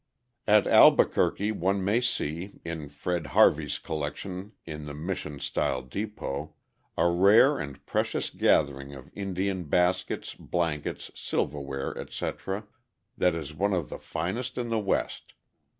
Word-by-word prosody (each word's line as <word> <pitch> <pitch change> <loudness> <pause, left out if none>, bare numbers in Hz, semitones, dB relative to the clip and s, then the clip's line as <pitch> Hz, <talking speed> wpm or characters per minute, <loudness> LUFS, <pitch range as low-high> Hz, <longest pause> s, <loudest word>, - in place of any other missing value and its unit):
At 105 -1 +6
Albuquerque 105 +2 +5
one 95 -1 0
may 110 +5 +3
see, 90 -5 -2
in 80 -3 -5
Fred 80 +2 -3
Harvey's 75 -1 +5
collection 90 +7 -5
in 75 -2 -6
the 70 - -6
Mission 75 -2 -4
style 65 - -1
depot, 75 - -5 0.4
a - - +4
rare 100 +11 +5
and 70 -2 -7
precious - - -1
gathering 70 -2 +1
of 65 - -12
Indian 95 -2 -2
baskets, 90 +4 +1
blankets, 80 -4 -3
silverware, 70 -1 -3
etc., 100 +3 -4 0.5
that 90 -2 +2
is 75 -2 -5
one 100 +6 +1
of 85 -6 -2
the - - -6
finest 115 +10 -3
in 120 -1 -2
the 115 -1 +1
West. 100 -2 -2
85 Hz, 130 wpm, -28 LUFS, 75-100 Hz, 0.5 s, At